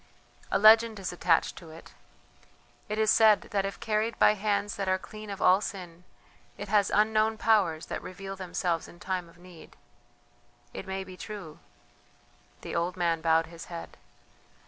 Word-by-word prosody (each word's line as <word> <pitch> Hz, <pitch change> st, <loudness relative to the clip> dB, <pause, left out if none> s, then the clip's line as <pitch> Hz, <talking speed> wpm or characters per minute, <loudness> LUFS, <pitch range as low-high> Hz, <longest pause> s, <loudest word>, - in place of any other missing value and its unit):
"A -, -, +2 dB
legend 220 Hz, +1 st, +6 dB
is 190 Hz, -2 st, -5 dB
attached 170 Hz, -2 st, +1 dB
to 165 Hz, -, -11 dB
it: 160 Hz, +1 st, -13 dB, 1.0 s
it 215 Hz, -, -2 dB
is 220 Hz, -1 st, +3 dB
said 215 Hz, -2 st, +5 dB
that 195 Hz, -1 st, 0 dB
if 195 Hz, -, -8 dB
carried 220 Hz, +1 st, -1 dB
by -, -, +5 dB
hands 205 Hz, 0 st, -1 dB
that 195 Hz, -1 st, -2 dB
are 185 Hz, -, +2 dB
clean 215 Hz, +2 st, -11 dB
of 200 Hz, -1 st, -4 dB
all 185 Hz, +2 st, +5 dB
sin 180 Hz, -4 st, -7 dB, 0.5 s
it 205 Hz, -, -7 dB
has 205 Hz, -1 st, +3 dB
unknown 215 Hz, +1 st, +2 dB
powers 195 Hz, -8 st, +2 dB
that -, -, -5 dB
reveal 195 Hz, +1 st, -8 dB
themselves 175 Hz, -2 st, -2 dB
in 175 Hz, -, -15 dB
time 180 Hz, -2 st, -4 dB
of 170 Hz, -, -20 dB
need. 175 Hz, -2 st, -15 dB, 1.0 s
It -, -, -7 dB
may 190 Hz, 0 st, -3 dB
be 185 Hz, -1 st, -12 dB
true 195 Hz, -8 st, -9 dB, 0.5 s
..." -, -, -33 dB
the -, -, -6 dB
old 175 Hz, +2 st, -1 dB
man 170 Hz, -2 st, 0 dB
bowed 165 Hz, 0 st, +3 dB
his 165 Hz, 0 st, -11 dB
head.... 170 Hz, -1 st, -9 dB
190 Hz, 170 wpm, -28 LUFS, 175-210 Hz, 1.0 s, legend